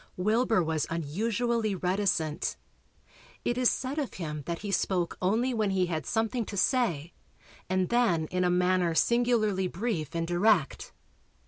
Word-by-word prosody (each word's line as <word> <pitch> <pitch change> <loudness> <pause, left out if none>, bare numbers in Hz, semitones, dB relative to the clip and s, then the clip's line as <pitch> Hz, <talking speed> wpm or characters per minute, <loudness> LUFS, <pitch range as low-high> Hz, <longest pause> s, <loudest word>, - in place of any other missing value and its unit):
Wilbur 215 +1 +2
was 160 -1 -1
unusually 215 +7 -1
reticent. 180 -4 -1 0.9
It 240 - +1
is 250 -1 +3
said 265 +4 -2
of 280 - -4
him 150 -4 -5
that 170 +3 -4
he 200 - -2
spoke 180 -3 0
only 225 +8 +1
when 215 -3 0
he 190 -1 +1
had 160 -5 -4
something 225 +2 0
to 200 - -7
say 175 - +1 0.6
and 185 -1 +1
then 230 -10 +2
in 180 0 0
a 180 - +2
manner 180 -1 +2
singularly 220 -4 +2
brief 175 - -3
and 165 0 0
direct. 175 -1 +1
190 Hz, 145 wpm, -28 LUFS, 170-230 Hz, 0.9 s, is